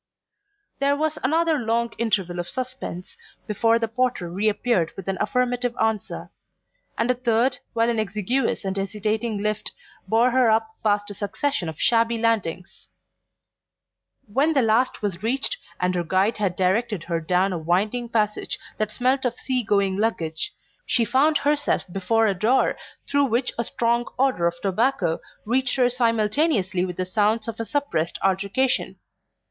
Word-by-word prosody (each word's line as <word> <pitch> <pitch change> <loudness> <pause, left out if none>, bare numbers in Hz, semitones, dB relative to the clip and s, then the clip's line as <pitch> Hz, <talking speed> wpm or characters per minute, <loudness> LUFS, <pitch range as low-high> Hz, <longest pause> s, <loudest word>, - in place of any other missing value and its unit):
There 280 +1 +2
was 310 +1 -1
another 320 +3 +2
long 235 0 0
interval 190 -6 0
of 175 - -4
suspense 255 -8 -6 0.3
before 225 +2 +2
the 230 -1 -1
porter 230 -7 -1
reappeared 210 -2 +1
with 195 - -8
an 195 -1 -2
affirmative 245 -1 0
answer; 220 -2 -1 0.7
and 230 +2 +2
a - - +3
third 245 +1 +1
while 230 -1 +2
an 235 -2 +1
exiguous 215 +3 -1
and 190 0 -2
hesitating 210 +2 -2
lift 215 0 -1 0.3
bore 235 +3 +3
her 255 -2 +4
up 220 0 +2
past 205 -1 +1
a - - -5
succession 205 - -2
of 160 - -9
shabby 230 0 +3
landings. 210 -6 -2 1.4
When 275 +9 +1
the 270 -4 +3
last 225 +2 +1
was 190 -4 -2
reached, 270 - 0 0.2
and 180 0 +1
her 175 -1 0
guide 190 +6 +1
had 200 -4 0
directed 190 +1 0
her 170 -1 -1
down 180 +4 +1
a 175 - -2
winding 205 +9 0
passage 210 -2 0 0.2
that 215 -1 -1
smelt 255 +4 +1
of 245 -2 0
sea 255 -1 0
going 200 -3 +1
luggage, 165 -8 -1 0.3
she 235 - +2
found 285 +6 +3
herself 290 0 +1
before 195 +5 +1
a 205 - +2
door 220 +8 +2 0.3
through 285 0 +3
which 245 0 0
a - - +2
strong 235 +1 0
odour 255 -10 +2
of 170 0 -3
tobacco 200 -4 +1 0.3
reached 250 +3 +1
her 250 -2 +3
simultaneously 230 - +1
with 180 -2 -6
the 185 - -1
sounds 215 +3 +1
of 230 -1 -5
a - - -1
suppressed 250 - -1
altercation. 200 +7 +1
225 Hz, 155 wpm, -24 LUFS, 195-250 Hz, 1.4 s, her